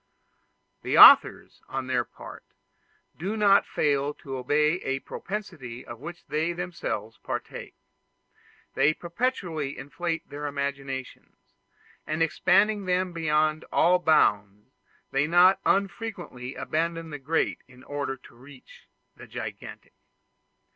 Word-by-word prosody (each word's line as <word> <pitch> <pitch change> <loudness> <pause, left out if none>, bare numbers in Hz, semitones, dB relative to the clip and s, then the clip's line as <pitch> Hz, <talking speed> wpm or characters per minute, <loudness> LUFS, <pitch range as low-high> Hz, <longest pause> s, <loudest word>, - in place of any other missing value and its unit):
The - - -1
authors, - - +7
on 135 -1 -4
their 125 -1 0
part, - - -12 0.8
do 200 +6 -3
not 200 -2 +4
fail 145 0 0
to 135 -4 -8
obey 150 +6 +1
a 135 0 -2
propensity 155 - -7
of 120 -1 -9
which 170 +5 -9
they 160 +3 -1
themselves 170 -10 -5
partake; - - -6 1.0
they 155 +2 +3
perpetually 170 - -3
inflate 160 +4 -4
their 145 +1 -6
imaginations, 140 -2 -5 0.7
and 155 +1 0
expanding 205 +5 +2
them 180 0 0
beyond 155 -1 +1
all 180 +2 +4
bounds, 105 - +1 0.4
they 135 +2 +1
not 180 +3 +5
unfrequently 195 - -2
abandon 165 0 -2
the 145 - -6
great 155 +5 -1
in 125 0 -17
order 145 -2 -4
to 125 - -18
reach 130 +2 -16 0.3
the - - -13
gigantic. - - -8
155 Hz, 115 wpm, -26 LUFS, 135-175 Hz, 1.0 s, authors